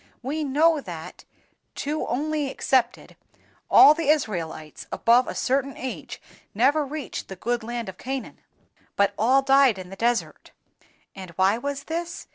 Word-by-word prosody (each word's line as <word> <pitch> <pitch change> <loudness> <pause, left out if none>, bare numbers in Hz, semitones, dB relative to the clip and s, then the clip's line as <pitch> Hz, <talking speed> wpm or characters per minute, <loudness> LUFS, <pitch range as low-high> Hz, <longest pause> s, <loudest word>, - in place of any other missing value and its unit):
We 300 +5 -2
know 300 +2 +3
that 170 -8 -9 0.5
(two 300 +2 -3
only 300 +2 -1
excepted) 255 -2 -1 0.5
all 295 - +8
the 310 -2 -2
Israelites 170 - -2
above 240 +2 +3
a - - -5
certain 275 +1 -1
age 260 0 -6 0.4
never 295 +2 +3
reached 290 +1 -6
the 190 - -8
good 240 +5 -2
land 235 +1 -5
of 190 -1 -9
Canaan, 265 0 -5 0.6
but 200 0 +2
all 255 +6 +3
died 270 -5 +4
in 185 0 -9
the - - -7
desert. 235 +3 -2 0.6
And 190 -2 -9
why 190 +5 +2
was 280 +1 -4
this? 335 +3 -5
260 Hz, 145 wpm, -24 LUFS, 215-285 Hz, 0.6 s, all